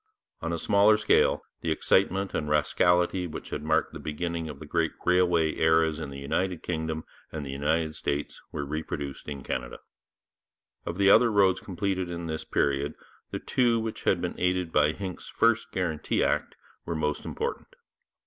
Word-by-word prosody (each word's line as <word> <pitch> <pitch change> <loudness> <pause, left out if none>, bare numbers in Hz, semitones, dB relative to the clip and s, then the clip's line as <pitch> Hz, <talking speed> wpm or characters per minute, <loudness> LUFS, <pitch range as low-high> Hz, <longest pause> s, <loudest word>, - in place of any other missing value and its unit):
On 85 - -2
a 85 - -1
smaller 100 +5 +4
scale, 110 0 +3 0.2
the 85 - -2
excitement 95 +4 +2
and 75 - -1
the - - -3
rascality 90 +4 +2
which 80 - -8
had - - -3
marked 80 +1 +1
the - - -7
beginning 85 +1 -3
of 75 - -7
the 75 - -9
great 80 +1 0
railway 90 -3 +3
eras 80 -1 +3
in 75 -3 -5
the 70 - -8
United 90 +6 -2
Kingdom 80 -2 -2 0.3
and 75 -2 -5
the 70 - -5
United 80 +3 0
States 70 -1 -3
were 70 - -3
reproduced 70 -2 -5
in 70 -2 -6
Canada. - - -4 1.1
Of 85 - -3
the 100 0 +5
other 115 +2 +6
roads 95 -3 +4
completed 95 -1 -2
in 85 -1 -5
this 80 -1 -3
period, 70 +1 0 0.3
the - - -3
two 120 -2 +2
which 110 -1 -4
had - - +3
been - - -2
aided 90 -1 0
by 75 0 +4
Hincks's 95 0 -6
first 115 0 +2
Guarantee 85 -5 0
Act - - 0 0.3
were 85 - -3
most 75 -1 -1
important. - - -4
80 Hz, 175 wpm, -28 LUFS, 75-90 Hz, 1.1 s, other